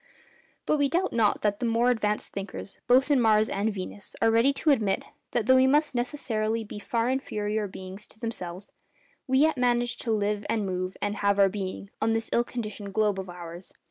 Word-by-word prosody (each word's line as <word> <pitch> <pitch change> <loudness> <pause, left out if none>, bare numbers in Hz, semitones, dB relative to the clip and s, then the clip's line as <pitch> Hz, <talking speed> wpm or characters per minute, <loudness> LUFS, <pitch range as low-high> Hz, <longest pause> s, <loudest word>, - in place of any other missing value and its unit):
But 305 - +2
we 285 -1 +3
doubt 365 +4 0
not 220 -3 +2
that 205 -1 +1
the 245 - -1
more 235 +2 +3
advanced 210 -3 -1
thinkers 195 0 -7
both 260 +4 +4
in 275 -3 +4
Mars 215 -1 +4
and 205 +2 0
Venus 200 0 -7
are 225 - +4
ready 230 +5 +4
to 300 +2 +2
admit 210 -8 +1 0.2
that, 235 - 0
though 260 +2 +6
we 260 0 +5
must 295 +2 +3
necessarily 230 -4 -1
be 210 0 -8
far 230 +2 -1
inferior 215 -5 -1
beings 190 +2 -9
to 220 - -18
themselves, 195 -5 -6 0.6
we 260 0 +2
yet 310 +1 +4
manage 240 -1 +1
to 230 - -3
'live 210 -1 0
and 215 -3 0
move 185 0 -3
and 205 +1 -1
have 200 -1 +2
our 195 -1 +5
being' 195 0 -5
on 225 +1 +2
this 225 0 -2
ill 235 - +4
conditioned 215 -5 -6
globe 210 -3 +2
of 190 -1 -6
ours. 175 0 -9
215 Hz, 205 wpm, -27 LUFS, 200-245 Hz, 0.6 s, though